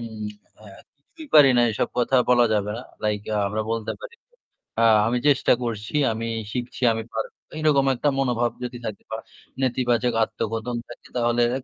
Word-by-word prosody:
উম 110 -2 -7 0.4
আ - - -17 0.3
কিছুই 310 - -14
পারি 145 -3 +9
না, 120 - +5
এসব 105 - -1
কথা 125 +2 +2
বলা 120 -1 +6
যাবে 105 0 0
না। 125 - -6 0.2
Like 105 -1 -1
আ - - +1
আমরা 110 +2 -2
বলতে 115 -1 -2
পারি - - -9 0.7
আ - - +4 0.2
"আমি 120 +2 +1
চেষ্টা 140 -2 +4
করছি, 105 -3 -4 0.2
আমি 115 +1 -3 0.3
শিখছি, 125 0 -5
আমি 110 0 -3
পারবো।" 110 - -4 0.2
এইরকম 150 -3 +3
একটা 145 +4 +1
মনোভাব 120 -3 +1
যদি 125 0 -5
থাকে 110 -2 -5
বা 110 - -2 0.4
নেতিবাচক 125 -2 +1
আত্মকথন 115 +2 -3
থাকে 120 - -12
তাহলে 120 0 +2 0.2
এক 135 - -9
120 Hz, 175 wpm, -24 LUFS, 110-130 Hz, 0.7 s, পারি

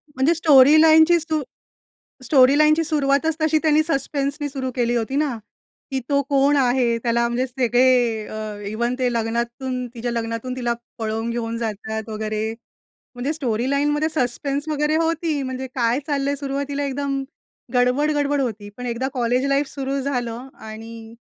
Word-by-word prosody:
म्हणजे 265 +5 +3
स्टोरी 300 -1 +6
लाईनची 320 +2 +6
स्टो 315 -1 -2 0.8
स्टोरी 265 +1 +5
लाईनची 305 +1 +4
सुरुवातच 300 0 +1
तशी 315 0 +3
त्यांनी 310 0 +4
सस्पेन्सनी 285 -1 -2
सुरु 265 -2 -4
केली 240 -1 0
होती 235 +4 -2
ना, 285 -5 0 0.5
की 265 -1 -1
तो 280 -1 +2
कोण 280 0 +3
आहे? 245 -3 +2
त्याला 235 0 +1
म्हणजे 245 +2 -1
सगळे 245 -3 +2
अ, 215 -1 -6
इव्हन 235 +3 -1
ते 250 -1 +1
लग्नातून, 235 +3 -2
तिच्या 240 +1 -3
लग्नातून 230 +2 -3
तिला 240 -2 -1 0.2
पळवून 225 +1 -2
घेऊन 230 -1 -3
जातात 220 -1 -4
वगैरे. 215 0 -3 0.6
म्हणजे 250 +4 -2
स्टोरी 255 -5 -2
लाईनमध्ये 295 +2 +1
सस्पेन्स 280 +2 -2
वगैरे 300 +1 +1
होती. 325 -2 0
म्हणजे 260 0 -4
काय 240 +1 +1
चाललं 280 -1 0
आहे 285 - -1
सुरुवातीला 280 +1 -3
एकदम 275 0 -2 0.5
गडबड-गडबड 285 +3 +2
होती. 215 -5 -3
पण 250 0 -6
एकदा 240 +2 -2
कॉलेज 250 0 0
लाईफ 275 +1 +2
सुरु 275 0 -3
झालं 250 -2 -3
आणि 225 +1 -9
260 Hz, 150 wpm, -22 LUFS, 235-285 Hz, 0.8 s, स्टोरी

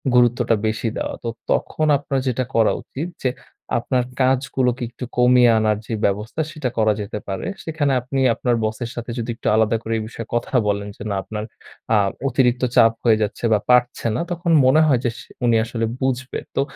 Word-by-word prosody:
গুরুত্বটা 120 -1 +4
বেশি 110 +2 -1
দেওয়া। - - -3
তো 115 - -2 0.2
তখন 155 - 0
আপনার 140 -1 -2
যেটা 130 0 0
করা 115 -1 +4
উচিত 150 +6 -6 0.2
যে 130 - +3 0.5
আপনার 125 +1 0 0.2
কাজগুলোকে 130 -1 +1
একটু 120 +1 -7
কমিয়ে 125 -1 +6
আনার 110 -1 +2
যে - - -3
ব্যবস্থা 105 +9 -1
সেটা 150 -5 -3
করা 110 -1 +3
যেতে 105 +1 -5
পারে। 95 -1 -4 0.2
সেখানে 155 -3 0
আপনি 130 +2 -3 0.2
আপনার 120 -2 0
বসের 110 +2 -3
সাথে 120 0 -5
যদি 115 +1 -4
একটু - - -6
আলাদা 110 +1 +3
করে 115 0 -3
এই 110 - -3
বিষয়ে 115 0 -8
কথা 120 +3 -2
বলেন 100 0 -1
যে - - -8
না 100 - -1
আপনার 105 -1 -5 0.5
আ - - +5 0.3
অতিরিক্ত 125 -1 +2
চাপ 115 0 +6
হয়ে 115 -2 +4
যাচ্ছে 105 +3 -5
বা 105 - +3
পারছে 125 -1 +3
না, - - -1
তখন 170 0 -1
মনে 135 +5 +5
হয় 135 -5 +3
যে - - +3
সে - - -13 0.2
উনি 120 -1 +4
আসলে 115 -1 -2 0.2
বুঝবে। 130 0 -1 0.2
তো - - +2
120 Hz, 195 wpm, -21 LUFS, 110-130 Hz, 0.5 s, কমিয়ে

